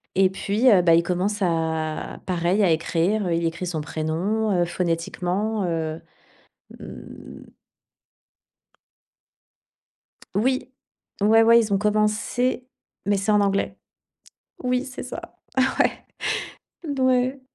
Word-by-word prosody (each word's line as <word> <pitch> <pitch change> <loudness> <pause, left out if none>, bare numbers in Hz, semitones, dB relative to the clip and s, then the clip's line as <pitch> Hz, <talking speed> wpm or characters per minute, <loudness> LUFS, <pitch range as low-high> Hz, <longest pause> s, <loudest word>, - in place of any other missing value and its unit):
et 190 0 +4
puis, 210 +6 +2
heu, 190 - +6
bah, 170 -2 +5
il 170 - +3
commence 185 +4 -1
à 160 -3 -1
pareil 180 +3 +1
à 180 - +4
écrire, 175 +5 +1
heu, 170 - 0
il 170 0 0
écrit 170 +2 -3
son 165 -3 -2
prénom, 170 +9 -1
heu, - - +3
phonétiquement, 180 +5 -2
heu, 165 -1 -2 0.8
mmh. - - -11 2.9
Oui, 255 +6 0 0.5
ouais, 220 +2 +6
ouais, 230 +1 +7
ils 220 -3 -1
ont - - +4
commencé, 215 +5 0 0.4
mais 205 0 +2
c'est 195 +2 0
en 210 -1 +4
anglais. 200 0 0 0.9
Oui, 250 +1 0
c'est 265 -1 -7
ça. - - -9 0.4
Ouais, - - +5 1.0
d 285 -3 -3
ouais. 260 +1 +2
195 Hz, 120 wpm, -23 LUFS, 170-220 Hz, 2.9 s, ouais